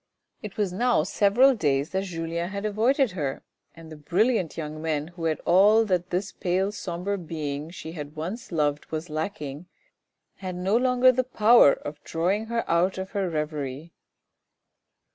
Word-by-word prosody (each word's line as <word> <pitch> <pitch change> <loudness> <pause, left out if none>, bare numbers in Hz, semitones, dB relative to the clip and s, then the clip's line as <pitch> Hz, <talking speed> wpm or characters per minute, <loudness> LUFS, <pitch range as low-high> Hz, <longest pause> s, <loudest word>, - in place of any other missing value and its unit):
It 210 -3 -8
was 200 -4 0
now 240 -3 +2
several 210 +9 +4
days 145 - 0
that 190 +1 -1
Julien 170 -1 -3
had 200 +1 -5
avoided 235 +4 +2
her, 145 -7 -4 0.3
and 160 -1 -12
the - - -8
brilliant 185 - 0
young 155 -1 -5
men 155 -1 -2
who 175 -1 -7
had 160 -1 0
all 205 +5 +5
that 180 -3 0
this 185 +2 -2
pale 185 +3 -1
sombre 195 0 -4
being 155 -3 -5
she 165 -2 -8
had 150 -2 -8
once 180 +10 -6
loved 150 -3 0
was 160 +1 -5
lacking, 155 -1 -4 0.7
had 185 -2 -5
no 185 +4 0
longer 250 +1 +4
the 255 +1 0
power 235 - +6
of 145 +1 -8
drawing 190 +7 -1
her 235 0 -2
out 175 +3 +2
of 190 0 -5
her 195 -3 -1
reverie. 150 -1 -4
180 Hz, 160 wpm, -26 LUFS, 155-205 Hz, 0.7 s, power